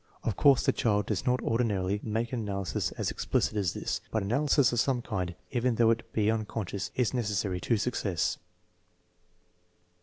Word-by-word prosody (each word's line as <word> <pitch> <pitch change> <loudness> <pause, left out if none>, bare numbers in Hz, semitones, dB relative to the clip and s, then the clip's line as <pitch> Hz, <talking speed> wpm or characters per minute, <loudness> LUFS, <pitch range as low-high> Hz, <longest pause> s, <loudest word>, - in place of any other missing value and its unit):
Of 115 - -1
course 140 -3 +5
the - - +5
child 105 -3 +1
does 105 +5 -2
not 125 0 +2
or 115 +1 0
dinarily 100 -4 0
make 115 +2 -2
an 125 - -1
analysis 100 -4 -2
as - - -2
explicit - - 0
as 100 -4 0
this; - - -2
but 110 -3 -1
analysis 135 +4 +3
of 120 - +1
some 125 0 +1
kind, 90 -6 -3 0.2
even 125 -1 +1
though 115 0 +4
it 115 0 -2
be 110 0 +2
unconscious, 105 -3 -3
is 125 -1 +1
necessary 100 -6 -1
to 115 - +1
success. 100 -6 -1
110 Hz, 175 wpm, -29 LUFS, 100-120 Hz, 0.2 s, course